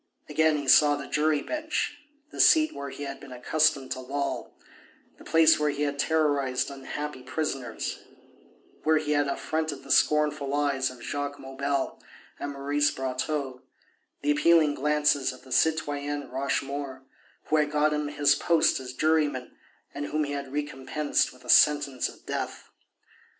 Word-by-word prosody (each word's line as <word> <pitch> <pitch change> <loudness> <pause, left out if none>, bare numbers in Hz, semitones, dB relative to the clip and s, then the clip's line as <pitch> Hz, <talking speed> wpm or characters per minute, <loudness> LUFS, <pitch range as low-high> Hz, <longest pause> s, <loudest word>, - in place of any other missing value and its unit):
Again 155 0 +2
he 145 -2 -5
saw 145 +2 +6
the 145 -1 -6
jury 150 -1 +1
bench, 310 -1 -2 0.4
the - - -10
seat 315 -1 +5
where 140 0 -6
he 145 - -8
had 140 -1 -6
been 140 - -12
accustomed 140 +2 +1
to - - -3
loll, 140 +2 -3 0.7
the - - -13
place 160 -1 +5
where 150 0 +1
he 145 0 -2
had 145 -1 -2
terrorized 145 -5 +1
unhappy 140 0 -6
prisoners, 130 -3 -4 0.8
where 160 0 +3
he 150 -1 -2
had 145 -1 +2
affronted 155 0 -3
the - - -7
scornful 150 -2 +2
eyes 140 -2 +1
of 125 -2 -12
Jacques 145 +2 -4
Maubel 140 0 -3 0.4
and 145 - -4
Maurice 145 +1 +1
Brotteaux, 130 0 -3 0.6
the 145 - +2
appealing 155 0 +4
glances 150 -1 +1
of 130 - -14
the 130 - -15
citoyenne 145 -2 0
Rochemaure, 135 0 -3 0.4
who 155 - +1
had 150 -1 +2
got 150 +1 +2
him 150 0 -1
his 145 -1 +3
post 165 +1 +2
as 130 -1 -8
juryman 150 -4 0 0.4
and 145 0 -4
whom 155 +1 0
he 145 - -4
had 140 -2 -5
recompensed 145 0 -1
with 125 - -18
a - - -11
sentence 145 -3 +4
of - - -16
death. - - -5
145 Hz, 155 wpm, -27 LUFS, 135-150 Hz, 0.8 s, saw